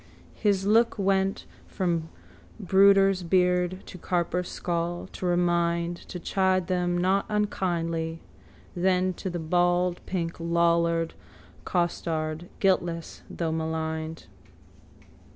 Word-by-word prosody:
His 200 -3 +1
look 230 +3 +3
went 195 -1 +1 0.2
from 170 -3 -1 0.5
brooder's 195 -1 +5
beard 180 +1 +1
to 180 - -10
carper's 180 0 -1
skull, 175 0 -2
to 185 - -4
remind, 175 -1 +1
to 180 - -6
chide 185 +1 +1
them 175 -1 0
not 190 +3 +1
unkindly, 170 -6 -1 0.6
then 185 +1 +2
to 190 - -5
the 175 - -4
baldpink 175 +1 0
lollard 170 0 +1 0.5
costard, 165 -2 -2
guiltless 175 -4 0
though 165 -2 -2
maligned. 160 0 -3
175 Hz, 100 wpm, -27 LUFS, 170-185 Hz, 0.6 s, brooder's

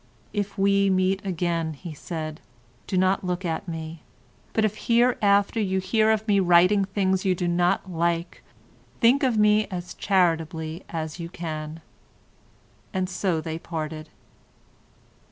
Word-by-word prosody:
"If 205 -1 -3
we 200 0 +3
meet 190 +1 +1
again," 170 -3 -1
he 165 +3 -8
said, 155 0 -6 0.5
"do 185 - -1
not 185 +1 +2
look 180 0 -2
at 165 +3 -3
me, 160 -1 -6 0.5
but 220 - +2
if 215 0 -4
hereafter 225 -3 +3
you 190 -3 0
hear 215 +3 +2
of 220 0 +1
me 200 -2 +4
writing 185 +2 +5
things 190 -1 0
you 190 -2 +2
do 175 0 -2
not 175 +2 +1
like, 170 -1 -2 0.6
think 250 +4 +5
of 255 -5 +2
me 210 0 +4
as 180 -1 -6
charitably 165 -3 0
as 160 0 -5
you 170 0 -5
can," 160 -2 -6 1.1
and 185 -1 -1
so 180 -3 -1
they 160 +1 -5
parted. 155 -2 -5
185 Hz, 140 wpm, -25 LUFS, 165-200 Hz, 1.1 s, writing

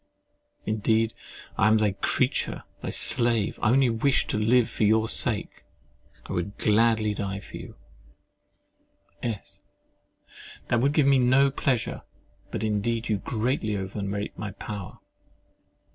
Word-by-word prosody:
Indeed 110 +1 +1 0.5
I 100 - +5
am 110 0 +5
thy 105 -2 +2
creature, 95 0 -1 0.2
thy - - -4
slave—I 115 -3 +2
only 130 -1 +4
wish 130 +4 +1
to 105 - 0
live 115 +2 +3
for - - -3
your 110 +1 +3
sake—I - - -3
would 95 +4 -3
gladly 110 0 +2
die 100 -1 -4
for 100 - -10
you— - - -10 1.5
S. 100 -4 -5 1.1
That 120 - +2
would 140 +3 +2
give 150 -2 +3
me 135 -1 +5
no 130 +2 +4
pleasure. 130 -3 -1 0.5
But - - -4
indeed 110 +2 -1
you 105 - +1
greatly 110 -1 -1
overrate 100 +1 -4
my 105 - -4
power. 100 -3 -7
110 Hz, 125 wpm, -26 LUFS, 105-120 Hz, 1.5 s, I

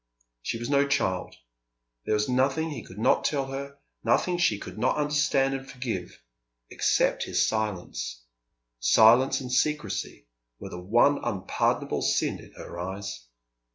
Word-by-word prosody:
She 115 - -3
was 120 +1 -5
no 140 0 +3
child. 95 -9 -1 0.7
There 110 - +1
was 105 0 +1
nothing 135 +5 +1
he 145 - -5
could 95 - -13
not 110 - +3
tell 140 -3 0
her, 140 +1 -6 0.3
nothing 180 -1 +2
she 110 -12 +3
could 105 - -9
not 125 +5 +1
understand 145 -2 +2
and 135 0 -5
forgive, 120 -9 -5 0.5
except - - +1
his - - +1
silence. 90 - -3 0.6
Silence 115 - +5
and 125 -1 -6
secrecy 150 - -1 0.3
were - - -8
the 90 - -7
one 120 +9 +3
unpardonable 100 -6 -1
sin - - +1
in - - -14
her 85 - -9
eyes. 90 -10 -6
120 Hz, 145 wpm, -27 LUFS, 95-140 Hz, 0.7 s, Silence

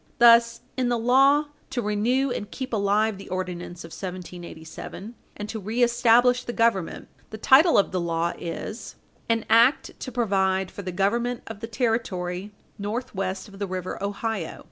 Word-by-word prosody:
Thus, 235 0 +6
in 255 -2 0
the 240 - +1
law 270 +5 +4 0.2
to 260 - -3
renew 240 +5 +1
and 205 -3 -4
keep 260 +1 -6
alive 205 0 +1
the 195 - -10
Ordinance 180 -1 -5
of 165 - -9
1787 180 +2 -8 0.2
and 210 - -5
to 220 - -4
reestablish 240 +3 +3
the 240 - -5
Government, 230 -7 0 0.2
the 220 - -7
title 285 - +6
of 200 - +3
the 185 - -1
law 170 0 -1
is: 175 +6 -6 0.3
"An 230 -1 +1
act 235 +5 +4
to 255 - -6
provide 190 -5 +1
for - - -7
the 185 -1 -5
government 235 +6 0
of 225 -2 -8
the 225 - -5
territory 210 -5 -2 0.3
northwest 200 -3 -3
of 195 -1 -14
the 200 - -2
river 185 0 -5
Ohio." 200 -3 -3
215 Hz, 160 wpm, -25 LUFS, 190-240 Hz, 0.3 s, Thus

